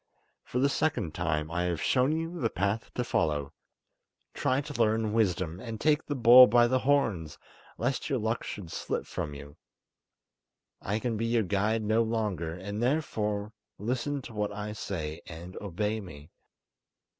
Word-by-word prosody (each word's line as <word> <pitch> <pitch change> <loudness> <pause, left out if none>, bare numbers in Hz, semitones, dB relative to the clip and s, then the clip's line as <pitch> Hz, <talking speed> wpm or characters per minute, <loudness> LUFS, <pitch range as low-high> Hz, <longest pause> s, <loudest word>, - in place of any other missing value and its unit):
For - - -5
the 135 +3 +4
second 135 - 0
time 75 -3 -1
I 90 +1 0
have 85 -3 -1
shown 130 +2 +2
you 165 +1 -3
the 115 - +2
path 100 +5 -1
to 125 - 0
follow; 75 - 0 0.8
try 130 +1 +1
to 145 -4 -3
learn 110 -1 +2
wisdom, 90 -6 0
and 115 0 -6
take 155 +2 +3
the 145 - -3
bull 125 +1 +9
by 120 +2 +5
the 130 +2 +2
horns, 115 - +1 0.4
lest 125 +5 -1
your 135 - +1
luck 110 +1 -1
should 90 -6 -7
slip - - -3
from 75 -1 -4
you! 70 0 -11 1.2
I 105 +2 -1
can 115 0 -2
be 115 +2 -1
your 115 -1 +2
guide 105 +4 0
no 110 +2 +3
longer, 105 -8 -1 0.2
therefore 105 -4 -1 0.2
listen 125 +6 -2
to 115 - -9
what 105 -1 -1
I 105 +1 -5
say, 80 -6 -4
and 85 +2 -9
obey 105 +3 -2
me. 75 -5 -11
110 Hz, 160 wpm, -29 LUFS, 90-125 Hz, 1.2 s, bull